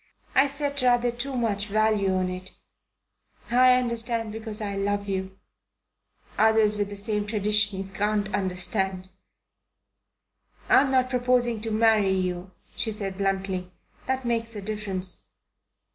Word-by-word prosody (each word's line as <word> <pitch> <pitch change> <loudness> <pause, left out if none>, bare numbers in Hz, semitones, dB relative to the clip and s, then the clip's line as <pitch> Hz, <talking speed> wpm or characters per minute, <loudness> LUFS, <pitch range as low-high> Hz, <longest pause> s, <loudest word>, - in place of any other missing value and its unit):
I 270 +2 +5
set 280 0 -3
rather 245 -1 +3
too 260 +3 -4
much 210 -3 0
value 215 -2 +2
on 185 0 0
it. 185 +1 -7 1.0
I 255 +1 +6
understand 235 -2 -1
because 220 -1 -3
I 205 -2 -3
love 200 +1 -1
you." 190 -1 -4 1.0
"Others 220 -1 +4
with 205 -1 -2
the 205 - -6
same 205 +1 -2
traditions 205 -2 +1
can't 205 0 0
understand." 190 0 -1 1.6
"I'm 270 0 +5
not 255 -1 +2
proposing 245 -2 +1
to 225 - -2
marry 215 -3 +3
you," 180 0 -3 0.3
she 235 -2 0
said 200 -3 -3
bluntly. 190 -2 -2 0.4
"That 260 -1 -1
makes 230 -1 -1
a 205 - -5
difference." 195 -3 -1
210 Hz, 130 wpm, -26 LUFS, 195-235 Hz, 1.6 s, I